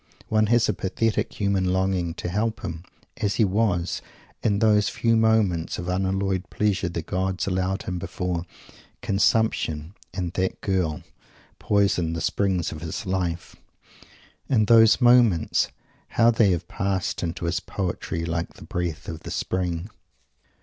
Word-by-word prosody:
One 110 0 +3
has 120 +1 +4
a 105 - +1
pathetic 105 +4 -1
human 100 -2 +1
longing 95 -3 0
to - - -5
think 110 +5 -1
of - - -18
him 85 -2 -5 0.3
as 100 -1 0
he 110 - +4
was, 95 -3 0 0.4
in 100 -2 +2
those 105 -1 +3
few 115 -1 +1
moments 110 -7 +2
of 90 +1 -4
unalloyed 95 0 -1
pleasure 100 -3 0
the 85 -1 -4
gods 95 +2 -1
allowed 95 0 -1
him 90 -1 -3
before 90 -1 -3 0.6
"consumption," 95 -6 +1 0.2
and 90 -3 -3
"that 95 0 -1
girl," 90 -6 -1 0.6
poisoned 100 -5 +1
the - - -2
springs 95 -4 0
of 80 - -7
his 85 +6 -5
life! 90 -3 -2 0.9
And 110 -5 +3
those 115 +1 +6
moments, 120 -9 +4 0.4
how 115 0 +4
they 110 -3 +4
have 90 -1 -1
passed 95 -2 -2
into 85 -1 -3
his 85 +1 0
poetry 85 -3 -3
like 85 0 -3
the - - -12
breath 85 -3 -3
of 80 - -5
the - - -9
Spring! 90 -1 -2
95 Hz, 150 wpm, -25 LUFS, 85-105 Hz, 0.9 s, those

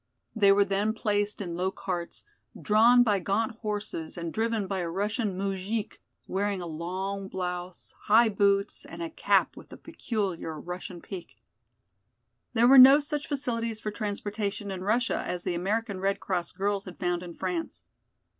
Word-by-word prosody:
They 200 -3 +5
were 200 0 +5
then 200 +2 0
placed 210 -1 -1
in 175 -4 -4
low 180 +2 0
carts, 185 -3 -5 0.4
drawn 235 +4 +5
by 210 -4 +2
gaunt 220 +4 -1
horses 210 -8 -4
and 170 -1 -4
driven 225 -2 0
by 190 0 -2
a 175 -2 -2
Russian 205 +2 -1
moujik, 195 +2 -3 0.3
wearing 200 0 -1
a 175 - -5
long 185 +4 -4
blouse, 180 -1 -5
high 225 +3 +6
boots 200 0 +1
and 335 - -7
a 330 - -5
cap - - +2
with - - -13
the - - -10
peculiar 185 -8 -4
Russian 180 +1 -7
peak. 180 - -9 1.2
There 240 0 +4
were 270 +1 +9
no 270 +3 +10
such 295 -1 -3
facilities 230 -6 -2
for 215 - -4
transportation 205 -1 -3
in 185 -1 -5
Russia 235 +6 +1
as 180 -1 -4
the 180 - -1
American 200 +3 -1
Red 195 +1 0
Cross 180 -3 -3
girls 200 +1 -1
had 185 - -10
found 175 -1 -1
in 175 -2 -8
France. 335 -2 -4
200 Hz, 165 wpm, -28 LUFS, 185-220 Hz, 1.2 s, no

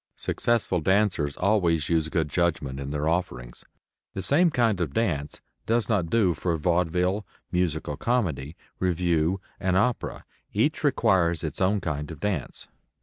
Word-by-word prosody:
Successful 115 -7 0
dancers 95 -5 +1
always 90 -6 +2
use 80 -2 +1
good 80 -2 0
judgment 75 -4 -1
in 70 0 -5
their 75 +1 -2
offerings. 80 -8 -3 0.5
The 95 - -3
same 170 +5 +4
kind 115 - +1
of 75 -5 -2
dance 80 -11 -1 0.3
does 115 -2 +1
not 95 -7 +1
do 100 -5 +3
for 85 +2 -1
vaudeville, 90 +4 +1 0.3
musical 80 -5 -1
comedy, 85 - -1 0.2
revue 90 0 +1 0.2
and 95 -1 +1
opera. 120 +4 -1 0.3
Each 135 +12 +1
requires 95 - +2
its 80 +2 -4
own 100 +2 +2
kind 75 -2 -3
of 80 -3 -8
dance. 105 -2 -3
90 Hz, 145 wpm, -26 LUFS, 80-105 Hz, 0.5 s, same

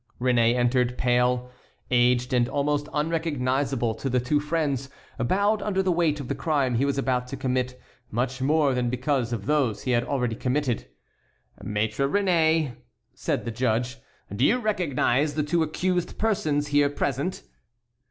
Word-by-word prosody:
Réné 120 -2 +3
entered, 125 0 +1
pale, 125 0 +1 0.4
aged, 125 0 +3
and 120 -1 +2
almost 145 +1 -1
unrecognizable 140 -6 0
to 135 +5 -4
the 125 0 +2
two 130 +5 +1
friends, 145 -4 -1 0.3
bowed 200 - +1
under 195 -2 0
the 185 - +1
weight 165 -3 +1
of 140 - -6
the - - -1
crime 145 -6 0
he 125 +4 +2
was 140 0 -1
about 125 -2 0
to 135 +2 -6
commit 125 -1 -2 0.3
much 125 +3 -2
more 145 0 +3
than 125 -1 0
because 125 -1 -1
of 110 -4 -3
those 135 -7 +1
he 130 - -1
had 120 -1 +2
already 125 -4 -1
committed. 125 -1 -1 0.8
"Maître 110 +6 -1
Réné," 165 - +2 0.4
said - - -2
the 115 - -2
judge, 125 +2 -1 0.4
"do 115 - 0
you 225 - +4
recognize 155 - 0
the 155 - +1
two 165 +3 +1
accused 180 +3 -1
persons 155 -9 0
here 145 0 +3
present?" 145 +4 -2
135 Hz, 155 wpm, -25 LUFS, 125-150 Hz, 0.8 s, you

